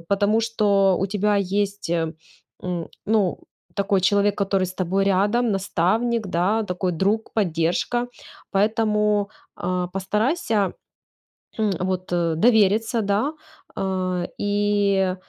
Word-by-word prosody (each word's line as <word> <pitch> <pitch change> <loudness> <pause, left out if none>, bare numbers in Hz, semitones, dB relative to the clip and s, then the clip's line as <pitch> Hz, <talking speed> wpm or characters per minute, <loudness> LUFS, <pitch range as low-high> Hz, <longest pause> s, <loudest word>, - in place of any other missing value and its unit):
потому 205 +2 +2
что 200 -4 +2
у 195 - 0
тебя 205 +1 +1
есть, 200 +1 -1
м, 165 -2 -1 0.9
ну, 210 -4 +1 0.4
такой 200 -1 +1
человек, 205 +1 +3
который 195 -2 +1
с 185 - -8
тобой 190 +2 0
рядом, 205 +5 +2
наставник, 210 +4 0
да, 190 +5 +1
такой 180 -2 -2
друг, 200 +6 0
поддержка. 185 +5 0 0.4
Поэтому, 210 0 +1 0.3
а, 180 0 -2
постарайся, 210 - 0 1.1
вот, 185 0 -2
довериться, 205 +6 +2
да, 210 +8 0 0.4
э, 185 -2 -2
и 205 -2 +1
200 Hz, 100 wpm, -23 LUFS, 185-210 Hz, 1.1 s, человек